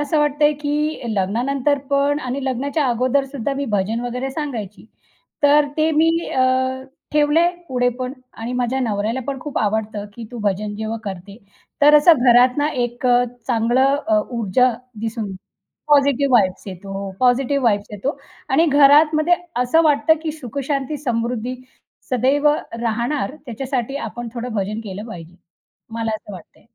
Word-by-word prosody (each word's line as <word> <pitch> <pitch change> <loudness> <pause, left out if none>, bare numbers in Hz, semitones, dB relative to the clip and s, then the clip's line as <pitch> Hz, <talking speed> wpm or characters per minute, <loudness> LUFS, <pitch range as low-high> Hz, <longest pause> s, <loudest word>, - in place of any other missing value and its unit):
असं 300 +1 0
वाटत 295 0 0
आहे, 295 0 +5
की 300 +1 -2
लग्नानंतर 250 +9 0
पण 280 +1 +2
आणि 260 0 -4
लग्नाच्या 275 +4 -1
अगोदरसुद्धा 270 +2 0
मी 280 +1 -2
भजन 210 +4 0
वगैरे 250 +2 -3
सांगायची. 245 - -5 0.6
तर 290 +1 +5
ते 315 +1 +2
मी 320 +1 +3 0.2
अ, 260 0 +1 0.3
ठेवलं 300 +2 +3
आहे 345 +1 +4 0.2
पुढे 245 -1 +1
पण 255 0 -3 0.3
आणि 230 +2 -4
माझ्या 250 +1 -1
नवऱ्याला 220 +1 -1
पण 275 -1 -3
खूप 295 0 -4
आवडतं, 210 0 -1
की 235 - -8
"तू 240 - -7
भजन 205 +1 -1
जेव्हा 220 +1 -3
करते 195 +1 -7 0.5
तर 295 +1 +7
असं 300 +3 +7 0.2
घरात 250 +2 +5
ना 290 +1 +2 0.2
एक 240 +1 -4
अ, 245 0 +4 0.2
चांगलं 250 +3 +2
अ, 215 -1 +4
ऊर्जा 240 +2 +2 0.3
दिसून, 225 -2 -3 0.6
पॉझिटिव्ह 280 -1 +4
व्हाइब्ज 195 -6 +3
येतो. 195 +1 -6
पॉझिटिव्ह 260 +2 +2
व्हाइब्ज 205 -4 +2
येतो." 260 +9 -3 0.3
आणि 315 +5 +3
घरातमध्ये 300 +3 +5 0.3
असं 320 +7 +3
वाटतं 295 +1 +4
की 315 -2 -2
सुखशांती, 280 0 -3
समृद्धी 245 -2 -2 0.6
सदैव 270 +4 +2 0.3
राहणार 240 +5 -1
त्याच्यासाठी 255 +2 -3
आपण 240 +1 -7
थोडं 240 0 -5
भजन 210 +2 -2
केलं 205 +1 -6
पाहिजे, 170 -4 -10 0.6
मला 225 -1 -2
असं 210 - -13
वाटतं. 180 -4 -13
255 Hz, 150 wpm, -20 LUFS, 225-285 Hz, 0.6 s, तर